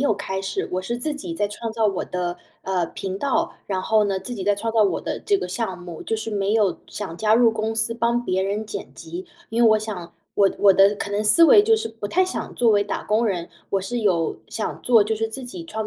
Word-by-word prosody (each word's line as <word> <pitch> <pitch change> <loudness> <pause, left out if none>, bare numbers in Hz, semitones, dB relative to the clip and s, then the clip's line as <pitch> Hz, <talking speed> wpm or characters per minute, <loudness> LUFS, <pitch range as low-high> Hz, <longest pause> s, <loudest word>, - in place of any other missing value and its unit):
有 280 -5 +3
开 190 -1 -4
始， 195 0 -3
我 185 - -1
是 235 +6 -3
自 295 +4 -2
己 330 +3 -6
在 205 -9 0
创 220 +2 -5
造 225 -1 +1
我 195 -3 -1
的， 180 -1 -3 0.3
呃， 185 -3 0
频 190 +2 -5
道。 275 +3 0
然 190 -2 -1
后 215 +1 +3
呢， 195 -1 0
自 245 - -5
己 195 - -5
在 205 0 +3
创 225 +2 -3
造 225 - +4
我 200 - +1
的 - - -4
这 400 -1 +1
个 180 - -4
项 190 -2 -3
目， 175 -2 -9
就 225 - -2
是 220 +1 -5
没 200 0 0
有 210 -5 +2
想 190 -5 -6
加 215 +2 +3
入 235 -1 +5
公 220 0 -2
司 225 +1 +1
帮 235 +1 +1
别 190 -2 0
人 205 +3 -2
剪 200 -2 -7
辑。 170 +3 -7 0.2
因 230 +2 +1
为 230 - +7
我 215 - +5
想， 200 -6 -6 0.2
我 200 -1 +4
我 200 -1 +6
的 195 +2 +5
可 200 0 -5
能 210 +1 -1
思 215 +11 +5
维 410 +5 +8
就 445 +1 +4
是 435 - -2
不 225 -2 -6
太 370 - +2
想 370 - -5
作 235 -2 +3
为 205 -1 +3
打 - - -3
工 220 +3 +1
人， 175 -4 -2 0.2
我 195 - +1
是 240 +6 -3
有 175 -7 +1
想 - - -4
做 230 -4 +5
就 220 +1 -1
是 225 +1 -1
自 260 +4 -7
己 185 -9 -8
创 220 +5 -4
210 Hz, 280 characters per minute, -23 LUFS, 190-230 Hz, 0.3 s, 维